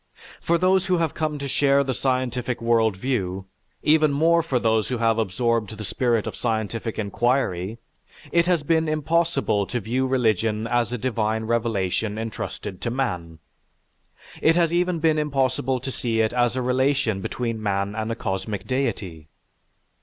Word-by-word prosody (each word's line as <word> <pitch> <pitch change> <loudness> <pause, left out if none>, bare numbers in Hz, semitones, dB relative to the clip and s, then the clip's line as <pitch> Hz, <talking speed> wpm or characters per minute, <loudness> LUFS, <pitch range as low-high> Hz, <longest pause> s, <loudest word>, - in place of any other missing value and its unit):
For 170 - +2
those 185 +2 +2
who 185 -1 +2
have 165 -3 0
come 155 -1 -2
to 140 -1 -4
share 140 +1 +3
the 130 -1 -2
scientific 125 -1 -1
world 115 -3 +2
view, 95 -5 -2 0.4
even 155 -1 +4
more 165 +4 +3
for 155 -6 -1
those 110 -2 +1
who 125 - -2
have 115 -1 +2
absorbed 110 0 0
the 110 - -6
spirit 115 +1 0
of - - -5
scientific 110 -1 -2
inquiry, 110 -2 0 0.5
it 170 0 +3
has 175 -4 +2
been 160 +1 +2
impossible 155 - +1
to 120 - -2
view 125 +5 -1
religion 110 -4 +1
as 120 -1 0
a 125 - -2
divine 110 -2 -1
revelation 110 -2 -1
entrusted 110 -3 -5
to 120 - -1
man. 90 -11 -3 1.0
It 165 - +4
has 170 -1 +2
even 180 0 +1
been 160 -1 +2
impossible 135 -3 0
to 135 +2 -5
see 115 -3 -1
it 110 +1 +1
as 120 0 +2
a 130 - -1
relation 130 -4 +1
between 115 +1 -3
man 100 -1 -1
and 110 +1 -3
a - - -2
cosmic 100 -1 -3
deity. 100 - -3
120 Hz, 160 wpm, -24 LUFS, 110-140 Hz, 1.0 s, even